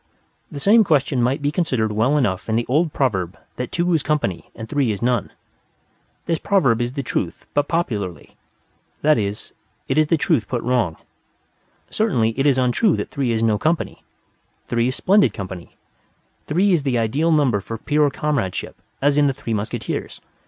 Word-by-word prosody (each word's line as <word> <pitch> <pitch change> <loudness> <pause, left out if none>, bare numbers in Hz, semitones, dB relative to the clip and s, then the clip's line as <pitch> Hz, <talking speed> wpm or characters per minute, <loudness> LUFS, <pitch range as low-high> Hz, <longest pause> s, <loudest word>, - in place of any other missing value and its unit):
The 145 - -6
same 220 +8 +5
question 145 -7 +1
might 135 +5 0
be 145 - +1
considered 130 -10 0
well 115 +8 +2
enough 110 -8 -1
in 110 - +1
the 115 +1 +1
old 155 +5 +2
proverb 95 -12 -1 0.2
that 125 -1 -4
two 175 0 +1
is 160 - +2
company 140 - -2
and 110 - -7
three 140 -5 +1
is 100 - -3
none. 120 0 0 0.9
This 165 -2 0
proverb 135 - +2
is 120 +1 -2
the 140 -1 -3
truth 95 -7 -3
put 145 - +1
popularly: 105 - -3 0.7
that 155 -4 +4
is, 100 0 -4 0.3
it 135 +3 +2
is 155 - +3
the 165 - +2
truth 150 -7 +1
put 120 -2 -3
wrong. 115 -10 0 0.9
Certainly 120 - +1
it 135 - +3
is 135 -2 +3
untrue 130 - +2
that - - -4
three 135 -4 -1
is 115 0 0
no 110 -2 +2
company. 160 +2 -1 0.7
Three 120 0 +1
is 130 - -1
splendid 200 +2 +3
company: 95 -3 -8 0.7
three 185 +6 +2
is 170 - +2
the 135 -3 0
ideal 135 +9 +1
number 135 -10 +2
for 115 +3 -6
pure 150 +4 +2
comradeship: 140 -10 -2 0.3
as 145 +1 +3
in 145 - +4
the 135 - +1
Three 115 - -4
Musketeers. 105 0 -4
130 Hz, 180 wpm, -21 LUFS, 115-150 Hz, 0.9 s, same